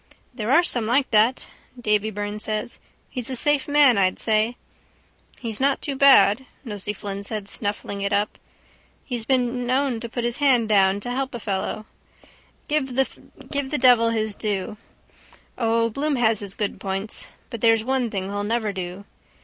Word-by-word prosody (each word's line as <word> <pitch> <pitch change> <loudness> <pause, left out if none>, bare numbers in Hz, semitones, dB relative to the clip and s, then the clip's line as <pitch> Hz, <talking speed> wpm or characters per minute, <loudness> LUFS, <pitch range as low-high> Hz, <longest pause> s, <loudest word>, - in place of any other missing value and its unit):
—There 230 -1 -3
are 335 +6 +6
some 240 -10 +2
like 265 +4 +1
that, 225 +4 +3 0.3
Davy 210 -2 +1
Byrne 205 0 -5
said. 215 +2 -3 0.3
He's 250 -2 -3
a 260 - -2
safe 290 +2 +3
man, 285 -6 +5
I'd 185 -1 +2
say. 220 +2 +1 0.8
—He's 230 -1 -4
not 275 0 +2
too 280 - -4
bad, 265 -3 +5 0.2
Nosey 210 -3 -3
Flynn 200 -1 -6
said, 210 -1 -5
snuffling 205 -1 -3
it 200 +1 -1
up. 205 +1 0 0.7
He's 240 -4 -3
been 245 -1 0
known 260 -1 +1
to 235 - -6
put 240 +1 -4
his 240 0 0
hand 260 -6 +3
down 195 -2 +4
too 205 +4 -4
to 245 - -3
help 265 -1 -3
a - - -5
fellow. 205 +1 -3 0.8
Give 275 -4 -1
the 275 +2 -3
devil 245 -3 +5
his 220 -2 -1
due. 210 0 -3 0.8
O, 230 -1 +1
Bloom 290 +5 -1
has 225 -4 +2
his 200 -2 -5
good 205 -2 -3
points. 195 +2 -2 0.2
But 230 - -6
there's 225 -1 +4
one 260 -1 0
thing 195 -3 -3
he'll 205 +1 -3
never 215 -1 -1
do. 185 +1 -6
225 Hz, 170 wpm, -23 LUFS, 205-255 Hz, 0.8 s, are